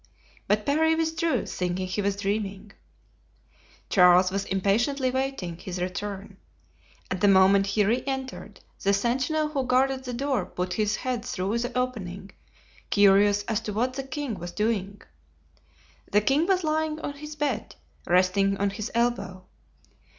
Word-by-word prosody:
But 210 Hz, 0 st, +1 dB
Parry 320 Hz, +3 st, +3 dB
withdrew, 320 Hz, 0 st, 0 dB
thinking 180 Hz, +1 st, -2 dB
he 185 Hz, +3 st, -2 dB
was 200 Hz, 0 st, 0 dB
dreaming. 200 Hz, 0 st, -3 dB, 1.2 s
Charles 180 Hz, 0 st, +5 dB
was 195 Hz, +1 st, -2 dB
impatiently 235 Hz, +8 st, +1 dB
awaiting 260 Hz, -10 st, -3 dB
his 180 Hz, 0 st, -6 dB
return. 195 Hz, +2 st, -5 dB, 0.7 s
At 185 Hz, -1 st, -2 dB
the 205 Hz, -, +5 dB
moment 195 Hz, 0 st, +5 dB
he 205 Hz, +1 st, +2 dB
re 235 Hz, +5 st, +1 dB
entered, 265 Hz, -1 st, -5 dB, 0.2 s
the 200 Hz, 0 st, +2 dB
sentinel 260 Hz, +9 st, 0 dB
who 280 Hz, -3 st, -1 dB
guarded 260 Hz, +1 st, +1 dB
the 250 Hz, -1 st, -5 dB
door 270 Hz, +1 st, 0 dB
put 180 Hz, 0 st, -3 dB
his 210 Hz, +2 st, 0 dB
head 250 Hz, -3 st, -3 dB
through 205 Hz, 0 st, -2 dB
the 245 Hz, +1 st, -3 dB
opening, 200 Hz, -7 st, -3 dB, 0.6 s
curious 205 Hz, 0 st, +4 dB
as 220 Hz, +1 st, -1 dB
to 210 Hz, -, -5 dB
what 245 Hz, +5 st, 0 dB
the 270 Hz, -, -3 dB
king 270 Hz, -, -5 dB
was 175 Hz, 0 st, -6 dB
doing. 205 Hz, -2 st, -2 dB, 1.1 s
The 210 Hz, -, +4 dB
king 280 Hz, +9 st, +2 dB
was 375 Hz, -2 st, +2 dB
lying 310 Hz, 0 st, -1 dB
on 285 Hz, -, -4 dB
his 300 Hz, +1 st, -9 dB
bed, 275 Hz, -7 st, -2 dB, 0.3 s
resting 185 Hz, +2 st, +3 dB
on 200 Hz, 0 st, 0 dB
his 215 Hz, +2 st, -5 dB
elbow. 215 Hz, -6 st, -1 dB
210 Hz, 150 wpm, -26 LUFS, 195-265 Hz, 1.2 s, Charles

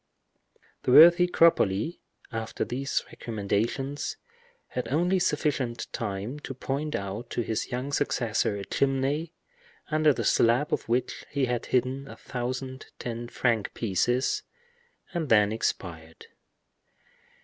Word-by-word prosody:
The -, -, 0 dB
worthy 175 Hz, +5 st, +9 dB
Cropoli, 165 Hz, -, +3 dB, 0.3 s
after 115 Hz, -1 st, -3 dB
these 135 Hz, +3 st, -1 dB
recommendations, 120 Hz, -, -2 dB, 0.5 s
had 125 Hz, -2 st, -3 dB
only 175 Hz, +8 st, +2 dB
sufficient 140 Hz, -8 st, -1 dB
time 105 Hz, +5 st, -3 dB
to 135 Hz, -, -7 dB
point 140 Hz, +4 st, -2 dB
out 100 Hz, +5 st, -4 dB
to -, -, -1 dB
his 110 Hz, +1 st, -2 dB
young 125 Hz, +3 st, -3 dB
successor 115 Hz, -7 st, 0 dB
a 100 Hz, -1 st, -5 dB
chimney, 140 Hz, +4 st, 0 dB, 0.6 s
under 155 Hz, 0 st, +4 dB
the 120 Hz, -4 st, -2 dB
slab 120 Hz, +8 st, +3 dB
of -, -, -2 dB
which 120 Hz, +1 st, 0 dB
he 140 Hz, -2 st, +1 dB
had 125 Hz, -1 st, -2 dB
hidden 130 Hz, +2 st, 0 dB
a -, -, -9 dB
thousand 130 Hz, +1 st, -5 dB
ten 120 Hz, 0 st, -5 dB
franc 115 Hz, -3 st, 0 dB
pieces, 120 Hz, +5 st, +1 dB, 0.7 s
and 165 Hz, -5 st, -2 dB
then 105 Hz, -2 st, +5 dB
expired. 115 Hz, -, -4 dB
125 Hz, 120 wpm, -27 LUFS, 115-145 Hz, 0.7 s, worthy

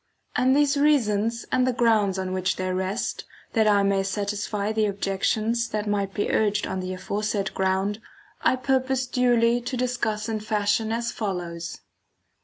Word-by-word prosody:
And 255 Hz, +1 st, +3 dB
these 290 Hz, 0 st, +3 dB
reasons, 230 Hz, -6 st, +2 dB
and 255 Hz, 0 st, +3 dB
the -, -, +3 dB
grounds 220 Hz, -5 st, +2 dB
on 185 Hz, -1 st, -3 dB
which 185 Hz, 0 st, 0 dB
they 185 Hz, 0 st, -2 dB
rest, 190 Hz, +4 st, -2 dB, 0.3 s
that 220 Hz, -2 st, +3 dB
I 205 Hz, -1 st, +4 dB
may 195 Hz, 0 st, +2 dB
satisfy 205 Hz, +1 st, -2 dB
the 220 Hz, -1 st, +1 dB
objections 215 Hz, +4 st, 0 dB
that 210 Hz, 0 st, -2 dB
might 200 Hz, -2 st, -1 dB
be 205 Hz, -, -1 dB
urged 210 Hz, -1 st, +1 dB
on 190 Hz, -, -3 dB
the 185 Hz, 0 st, -4 dB
aforesaid 200 Hz, +1 st, -2 dB
ground, 190 Hz, +3 st, 0 dB, 0.4 s
I -, -, +3 dB
purpose 260 Hz, 0 st, 0 dB
duly 245 Hz, -1 st, +2 dB
to 250 Hz, +2 st, -4 dB
discuss 240 Hz, -4 st, -1 dB
in 220 Hz, -1 st, -2 dB
fashion 215 Hz, 0 st, 0 dB
as 235 Hz, +1 st, -1 dB
follows. 175 Hz, -5 st, -4 dB
210 Hz, 160 wpm, -25 LUFS, 195-235 Hz, 0.4 s, I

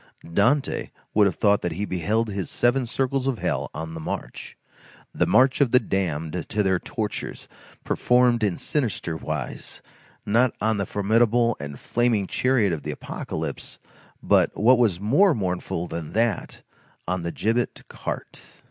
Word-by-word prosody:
Dante 125 Hz, -, +2 dB, 0.2 s
would 105 Hz, -1 st, +5 dB
have 95 Hz, -, -2 dB
thought 100 Hz, -2 st, +3 dB
that 85 Hz, -, -2 dB
he 100 Hz, +5 st, -3 dB
beheld 105 Hz, +5 st, 0 dB
his 100 Hz, -3 st, -4 dB
seven 120 Hz, +1 st, +1 dB
circles 135 Hz, +2 st, -1 dB
of 130 Hz, -3 st, 0 dB
hell -, -, -2 dB
on 80 Hz, 0 st, -6 dB
the 80 Hz, -, -6 dB
march. 80 Hz, -, -6 dB, 0.6 s
The -, -, +1 dB
march 130 Hz, +2 st, +4 dB
of 140 Hz, -, +4 dB
the 125 Hz, -, +5 dB
damned 90 Hz, -5 st, -2 dB
to 105 Hz, -, +1 dB
their 95 Hz, -2 st, +2 dB
tortures, -, -, -5 dB, 0.4 s
performed 125 Hz, -2 st, +3 dB
in 100 Hz, -4 st, +1 dB
sinister 115 Hz, -, -2 dB
wise, 75 Hz, -5 st, -5 dB, 0.4 s
not 120 Hz, +4 st, +2 dB
on 110 Hz, 0 st, +1 dB
the 100 Hz, -1 st, -2 dB
formidable 115 Hz, +3 st, +2 dB
and 70 Hz, -1 st, -7 dB
flaming 120 Hz, -4 st, +1 dB
chariot 115 Hz, -3 st, +1 dB
of 80 Hz, -, -3 dB
the -, -, -6 dB
Apocalypse, -, -, -5 dB, 0.5 s
but, -, -, +3 dB
what 125 Hz, +4 st, +5 dB
was 105 Hz, -8 st, +2 dB
more 145 Hz, -, +4 dB
mournful 90 Hz, -4 st, -2 dB
than 85 Hz, -3 st, -6 dB
that, 115 Hz, 0 st, -1 dB, 0.4 s
on 90 Hz, +1 st, -1 dB
the 85 Hz, 0 st, -3 dB
gibbet 115 Hz, +6 st, -1 dB
cart. -, -, -6 dB
105 Hz, 155 wpm, -24 LUFS, 90-120 Hz, 0.6 s, would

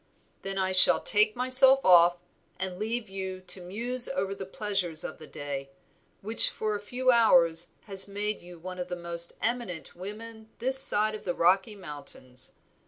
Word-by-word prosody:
"Then 195 Hz, 0 st, -6 dB
I 190 Hz, 0 st, -2 dB
shall 185 Hz, 0 st, +8 dB
take 215 Hz, 0 st, +2 dB
myself 260 Hz, +2 st, +4 dB
off 175 Hz, -1 st, +4 dB, 0.4 s
and 185 Hz, -1 st, -4 dB
leave 225 Hz, +1 st, -5 dB
you 190 Hz, -1 st, -8 dB
to 185 Hz, 0 st, -5 dB
muse 235 Hz, +7 st, -1 dB
over 195 Hz, -8 st, -4 dB
the 190 Hz, -1 st, -10 dB
pleasures 195 Hz, -6 st, -4 dB
of -, -, -9 dB
the 155 Hz, -, -13 dB
day, 140 Hz, -1 st, -8 dB, 0.5 s
which 220 Hz, +3 st, +3 dB
for 215 Hz, -1 st, -5 dB
a -, -, -6 dB
few 255 Hz, +4 st, -2 dB
hours 175 Hz, -8 st, +2 dB
has 195 Hz, -2 st, +1 dB
made 205 Hz, +1 st, -6 dB
you 175 Hz, 0 st, -15 dB
one 180 Hz, +2 st, -10 dB
of 180 Hz, -, -6 dB
the 180 Hz, -, -6 dB
most 170 Hz, 0 st, -1 dB
eminent 230 Hz, -9 st, -5 dB
women 220 Hz, +4 st, -11 dB
this 260 Hz, +3 st, +7 dB
side 215 Hz, -5 st, +1 dB
the 175 Hz, -, -5 dB
Rocky 190 Hz, +5 st, 0 dB
Mountains. 140 Hz, -7 st, -11 dB
195 Hz, 170 wpm, -25 LUFS, 175-220 Hz, 0.5 s, shall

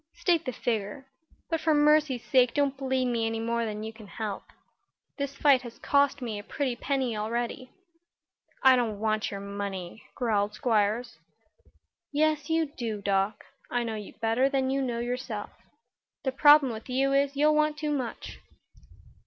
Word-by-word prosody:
"State 340 Hz, -3 st, +1 dB
the 255 Hz, -, -2 dB
figure. 225 Hz, +2 st, -3 dB, 0.5 s
But 325 Hz, -1 st, 0 dB
for 315 Hz, -1 st, +3 dB
mercy's 295 Hz, -4 st, +3 dB
sake 250 Hz, -3 st, +3 dB
don't 285 Hz, -2 st, +1 dB
bleed 265 Hz, -1 st, -1 dB
me 235 Hz, -2 st, 0 dB
any 225 Hz, 0 st, -2 dB
more 230 Hz, +1 st, -1 dB
than 215 Hz, -1 st, -4 dB
you 220 Hz, 0 st, -6 dB
can 220 Hz, -2 st, -13 dB
help. 210 Hz, -2 st, -5 dB, 0.7 s
This 280 Hz, 0 st, -3 dB
fight 275 Hz, -3 st, +4 dB
has 235 Hz, -2 st, -10 dB
cost 280 Hz, -1 st, +2 dB
me 220 Hz, -4 st, -3 dB
a -, -, -9 dB
pretty 260 Hz, +2 st, -2 dB
penny 260 Hz, -2 st, -1 dB
already." 235 Hz, +4 st, -3 dB, 0.9 s
"I 265 Hz, -1 st, +8 dB
don't 225 Hz, -5 st, -1 dB
want 215 Hz, 0 st, 0 dB
your 200 Hz, -, -5 dB
money," 200 Hz, -1 st, -5 dB
growled 210 Hz, -4 st, 0 dB
Squiers. 225 Hz, +1 st, 0 dB, 0.9 s
"Yes 305 Hz, 0 st, +1 dB
you 325 Hz, 0 st, +2 dB
do, 225 Hz, -4 st, -3 dB
Doc. 200 Hz, +1 st, 0 dB, 0.2 s
I 245 Hz, 0 st, 0 dB
know 230 Hz, -1 st, -3 dB
you 210 Hz, -2 st, -7 dB
better 230 Hz, +4 st, +2 dB
than 265 Hz, -1 st, 0 dB
you 275 Hz, 0 st, 0 dB
know 245 Hz, -3 st, -2 dB
yourself. 240 Hz, -3 st, -4 dB, 0.7 s
The 265 Hz, -, 0 dB
trouble 290 Hz, -2 st, +6 dB
with 220 Hz, +3 st, -9 dB
you 270 Hz, +2 st, +1 dB
is, 280 Hz, 0 st, +2 dB
you'll 300 Hz, +2 st, +4 dB
want 305 Hz, 0 st, +2 dB
too 305 Hz, -1 st, -2 dB
much." 260 Hz, -5 st, -4 dB
245 Hz, 165 wpm, -28 LUFS, 220-280 Hz, 0.9 s, I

